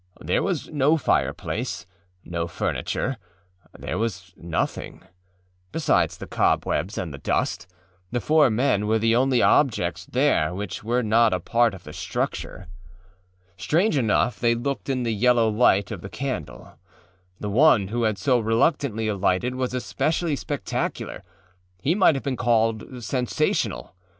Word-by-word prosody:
There - - 0
was - - -2
no 150 +2 +2
fireplace, 150 - -1 0.4
no 85 -1 -3
furniture; 125 +8 -2 0.6
there 90 - -4
was 95 -4 -4
nothing: 85 -1 -4 0.7
besides 165 - +1
the - - -7
cobwebs 100 +5 0
and 85 -5 -4
the 70 - -8
dust, 85 - -1 0.4
the 120 - 0
four 155 +3 +4
men 110 -3 +1
were 110 +1 +3
the 115 +1 +2
only 130 0 +3
objects 135 -7 +2
there 80 +3 +1
which 100 -1 -5
were 120 +3 0
not 110 -1 +3
a - - -2
part 115 +3 +1
of 95 - -13
the 75 - -10
structure. - - -4 0.9
Strange 160 - +1
enough 120 -1 +1
they 120 -1 +2
looked 135 +4 -3
in 130 -2 0
the 115 -1 0
yellow 120 +1 +3
light 105 -3 +3
of 100 -6 -6
the 100 - -8
candle. 115 - -6 0.6
The 105 - -4
one 115 -5 +4
who 120 +2 -2
had 110 -3 +1
so 125 +6 +2
reluctantly 115 0 +1
alighted 100 +3 0
was 130 0 -2
especially 155 +5 -1
spectacularâhe 90 - -5
might 190 -6 +5
have 135 - -4
been 135 -3 -2
called 115 +1 0
sensational. 125 -5 -1
115 Hz, 140 wpm, -24 LUFS, 100-130 Hz, 0.9 s, might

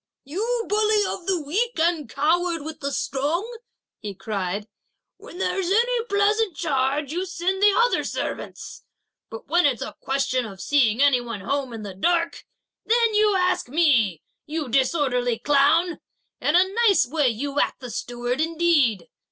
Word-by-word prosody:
"You 450 - -2
bully 425 0 +2
of 365 -1 -5
the 375 -2 +1
weak 395 +11 -2
and 325 -5 0
coward 330 +4 0
with 315 0 -7
the 280 0 -3
strong," 340 - -2 0.4
he 205 -2 -7
cried, 200 0 -4 0.5
"when - - -12
there's 380 -1 -1
any 470 +3 +2
pleasant 410 -3 +1
charge, 275 -1 0
you 360 +2 -1
send 370 +2 -2
the 415 0 +6
other 485 +1 +3
servants, - - -5 0.5
but 225 - -9
when 345 +1 +3
it's 255 -6 -1
a - - -8
question 270 -2 0
of 195 -4 -9
seeing 245 +1 +2
any 275 -4 +4
one 230 -4 -6
home 275 +5 -2
in 225 -2 -7
the 200 -2 -7
dark, 335 - -1 0.4
then 460 -1 +2
you 420 -1 +3
ask 365 -8 0
me, 245 - +2 0.2
you 300 -3 -4
disorderly 250 -2 +1
clown! 295 +7 +2 0.4
a - - +2 0.4
nice 395 -10 +4
way 285 +1 +1
you 280 +5 -3
act - - 0
the 250 -3 -8
steward, 245 +4 -3
indeed! 315 - +1
295 Hz, 155 wpm, -23 LUFS, 250-365 Hz, 0.5 s, the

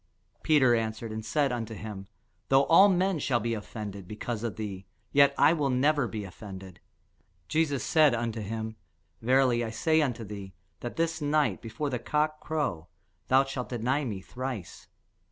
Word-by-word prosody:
Peter 140 -6 +4
answered 110 0 -2
and 110 0 -5
said 140 +5 +1
unto 115 -2 -4
him, 100 -2 -7 0.4
Though 135 +1 +5
all 180 +6 +7
men 185 -2 +1
shall 125 -4 +1
be 115 +1 -1
offended 105 -3 -6
because 110 +1 -4
of 115 -3 -3
thee, 100 -3 -6 0.2
yet 140 0 +5
will 150 -1 +4
I - - 0
never 135 +1 +2
be 110 -2 -5
offended. 95 -1 -10 0.7
Jesus 150 - +1
said 155 -6 +4
unto 115 -1 -2
him, 110 +1 -5 0.4
Verily 125 0 +3
I 115 - -3
say 155 +8 +2
unto 125 -6 -1
thee, 100 -2 -8 0.3
That 120 - -6
this 165 -1 -1
night, 150 0 +1
before 120 +6 -4
the 125 - -1
cock 155 +4 0
crow, 145 - -2 0.4
thou 130 +1 +5
shalt 135 -2 -5
deny 125 +4 0
me 105 -7 -4
thrice. 125 -3 -6
120 Hz, 165 wpm, -28 LUFS, 110-145 Hz, 0.7 s, all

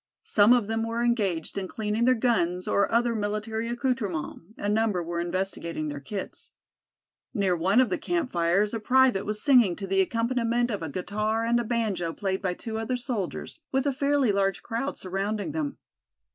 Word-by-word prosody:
Some 210 +2 +5
of 245 -3 +5
them 225 0 -1
were 230 +1 -1
engaged 200 -7 0
in 190 - -4
cleaning 215 +3 -1
their 255 0 +5
guns 185 -7 +1
or 200 - +2
other 235 +1 +2
military 215 +1 -2
accoutrements, 240 - -2 0.2
a 205 - -3
number 210 -4 +1
were 170 +1 -3
investigating 170 -3 -2
their 145 -1 -5
kits. 195 +8 -6 0.9
Near 195 -3 +2
one 190 +7 +3
of 255 -6 +3
the - - 0
camp 340 -7 -1
fires 175 +5 +2
a 225 - -1
private 255 -3 +3
was 210 0 +1
singing 245 - +5
to 195 - -6
the 195 0 +2
accompaniment 235 +3 0
of 205 - -3
a 160 - -4
guitar 215 +7 -1
and 235 +1 +2
a - - 0
banjo 215 -8 -1
played 190 0 -2
by 180 -3 -1
two 220 +2 -5
other 240 +3 -1
soldiers, 240 - -4
with 270 +1 +1
a 280 - +1
fairly 280 -3 +2
large 195 -1 0
crowd 235 +4 -3
surrounding 200 - -2
them. 295 -3 -3
215 Hz, 185 wpm, -27 LUFS, 190-240 Hz, 0.9 s, Some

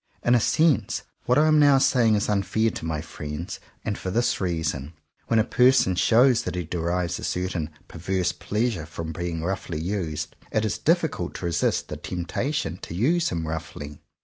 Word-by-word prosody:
In 120 - +4
a 120 - +5
sense 145 - +2 0.2
what 125 - +4
I 150 - +5
am 155 -1 +5
now 145 -2 +6
saying 120 -4 +4
is 105 - 0
unfair 105 +2 +1
to - - -6
my 80 -2 -2
friends; 75 +7 -6 0.3
and 105 -3 -2
for 95 - -4
this 115 +3 +1
reason: 80 -5 -2 0.3
when 115 - +2
a 110 - +5
person 125 -4 +4
shows 120 +6 +4
that - - -4
he 90 - -2
derives 85 +1 -2
a - - -8
certain 90 -3 -2 0.2
per 85 - -10
verse 90 +1 0
pleasure 105 -5 -2
from 80 0 -5
being 85 0 -3
roughly 90 -3 -3
used, 80 -4 -3 0.2
it 110 0 +1
is 105 - -2
difficult - - 0
to - - -5
resist 85 -2 0
the - - -5
temptation 90 - -3
to 85 - -7
use 165 - +2
him 85 -2 -3
roughly. 75 -2 -6
90 Hz, 185 wpm, -25 LUFS, 80-115 Hz, 0.3 s, now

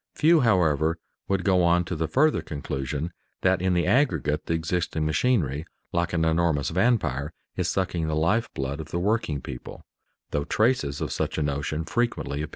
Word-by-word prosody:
Few, 165 +2 +5
however, 85 - +2 0.3
would 95 -2 0
go 95 -1 +3
on 85 0 +3
to 85 - -3
the 80 0 -1
further 155 - +3
conclusion 70 +2 -4 0.3
that 95 -1 +3
in 95 -1 +2
the 85 - +2
aggregate 120 - +1
the 80 - +1
existing 80 -1 -1
machinery, 80 - +1 0.3
like 85 0 0
an 80 -2 +1
enormous 80 -3 +1
vampire, 80 - +1 0.2
is - - 0
sucking 90 -4 -1
the 80 - -1
life 95 +9 +1
blood 70 +2 -3
of 80 0 -7
the 85 - -2
working 100 - 0
people, 65 -1 -9 0.5
though 70 0 -1
traces 110 - +1
of - - -2
such - - -2
a 80 - +1
notion 75 +2 -2
frequently 115 -8 -1
appear. 75 - -4
85 Hz, 175 wpm, -26 LUFS, 75-95 Hz, 0.5 s, Few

